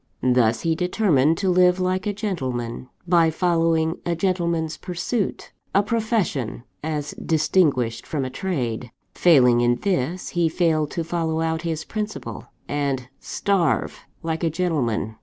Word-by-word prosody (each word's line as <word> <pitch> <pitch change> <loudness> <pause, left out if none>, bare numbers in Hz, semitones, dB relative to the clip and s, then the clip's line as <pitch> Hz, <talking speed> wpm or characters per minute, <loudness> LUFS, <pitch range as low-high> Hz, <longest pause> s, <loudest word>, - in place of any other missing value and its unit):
Thus, 125 -3 +3
he 165 - +1
determined 165 -4 +2
to 190 -2 +1
live 180 0 +4
like 185 +1 0
a - - +1
gentleman, 130 - -3 0.2
by 170 -2 +4
following 165 -1 +1
a 170 - -1
gentleman's 170 -3 0
pursuit 185 +5 -3 0.2
a 200 - +5
profession, 215 - -1 0.2
as 150 -2 -2
distinguished 145 -8 +1
from 145 -4 -2
a 130 - -5
trade. 125 -7 -3 0.2
Failing 125 -8 +5
in 120 0 +3
this, 175 +1 -1
he 170 -2 +1
failed 160 -3 +1
to 170 - -3
follow 165 -1 -1
out 160 0 0
his 160 -1 -3
principle, 215 -1 -5 0.2
and 140 -3 -2
starve 195 -5 0 0.2
like 160 +1 -2
a 165 - +3
gentleman. 140 - -1
165 Hz, 140 wpm, -23 LUFS, 135-180 Hz, 0.2 s, a